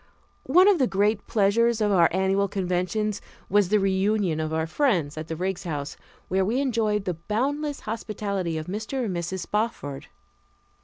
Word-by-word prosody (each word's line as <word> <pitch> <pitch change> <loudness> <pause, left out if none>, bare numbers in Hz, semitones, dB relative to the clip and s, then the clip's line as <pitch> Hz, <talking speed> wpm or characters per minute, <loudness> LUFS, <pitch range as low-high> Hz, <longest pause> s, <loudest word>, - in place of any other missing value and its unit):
One 360 +7 +6
of 400 -5 +5
the 260 - +3
great 205 +1 +1
pleasures 230 +2 +2
of 210 -1 +2
our 175 -4 +5
annual 190 +2 +1
conventions 195 +2 -1 0.3
was 205 -2 +3
the 210 - +4
reunion 195 -3 +1
of 155 0 -2
our 160 0 0
friends 170 - 0
at 155 0 -6
the 160 - -4
Riggs 185 +2 -3
House, 150 -4 -4 0.3
where 190 +1 +1
we 225 +7 0
enjoyed 220 -6 0
the 180 - -1
boundless 275 - -2
hospitality 200 -6 -3
of 155 - -4
Mr. 220 +7 -3
and 190 -5 -3
Mrs. 175 +2 -3
Spofford. 160 -10 -3
200 Hz, 165 wpm, -25 LUFS, 175-220 Hz, 0.3 s, One